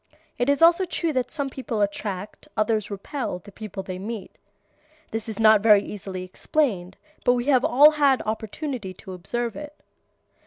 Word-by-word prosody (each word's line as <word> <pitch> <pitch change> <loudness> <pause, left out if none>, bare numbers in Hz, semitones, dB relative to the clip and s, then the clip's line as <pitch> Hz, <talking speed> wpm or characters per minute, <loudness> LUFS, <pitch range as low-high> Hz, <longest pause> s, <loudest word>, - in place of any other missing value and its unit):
It 245 +3 +1
is 285 +3 +3
also 340 +3 +6
true 335 -2 -2
that 250 -2 -1
some 285 -1 -2
people 255 -4 -4
attract, 200 -1 -3
others 215 -1 +1
repel, 210 +2 -4
the 205 +3 -14
people 210 -2 -7
they 185 -1 -6
meet. 210 +1 -6 0.8
This 225 0 -4
is 220 - -4
not 215 -1 +6
very 210 -2 +6
easily 190 -3 -6
explained, 190 -2 -1 0.3
but 245 - +4
we 245 -1 -1
have 255 -1 +4
all 300 0 +7
had 285 -3 +3
opportunity 220 -1 -4
to 190 0 -10
observe 230 +6 -3
it. 295 0 -8
220 Hz, 165 wpm, -24 LUFS, 200-270 Hz, 0.8 s, all